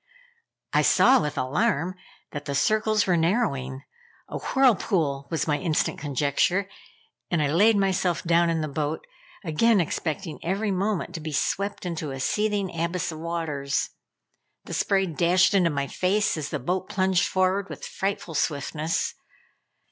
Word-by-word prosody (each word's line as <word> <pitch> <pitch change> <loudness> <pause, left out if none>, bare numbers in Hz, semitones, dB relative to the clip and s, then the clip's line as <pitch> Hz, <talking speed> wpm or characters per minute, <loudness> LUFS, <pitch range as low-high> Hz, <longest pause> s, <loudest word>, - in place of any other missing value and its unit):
I - - +4
saw, 265 - +5
with 150 -1 -3
alarm, 145 +6 0 0.4
that 145 - -6
the 140 - -3
circles 215 +7 +2
were 180 - +2
narrowing 160 - 0 0.4
A - - -5
whirlpool 185 - +1
was 165 -1 -1
my 150 -1 +1
instant 165 -5 0
conjecture, 145 +7 +1 0.6
and 170 - +1
I 150 - +2
laid 210 +5 +5
myself 185 -3 +1
down 170 0 +3
in 165 -1 0
the 155 - -2
boat, 150 +2 -3 0.4
again 200 +6 +3
expecting 165 0 -3
every 200 +4 -1
moment 190 -2 -1
to 170 - -4
be 155 0 -5
swept 200 +7 -1
into 165 -4 -3
a 135 0 -6
seething 205 +3 0
abyss 170 +1 -1
of 155 - -8
waters. 155 -4 -2 0.7
The - - -8
spray 195 -1 +2
dashed 180 +3 +3
into 185 -4 +4
my 140 -2 -1
face 195 +8 +1
as 150 -3 -4
the - - -2
boat 185 +7 -2
plunged 190 -3 +2
forward 185 +1 +1
with - - -7
frightful 195 -3 -3
swiftness. 155 +3 -1
170 Hz, 150 wpm, -25 LUFS, 150-195 Hz, 0.7 s, saw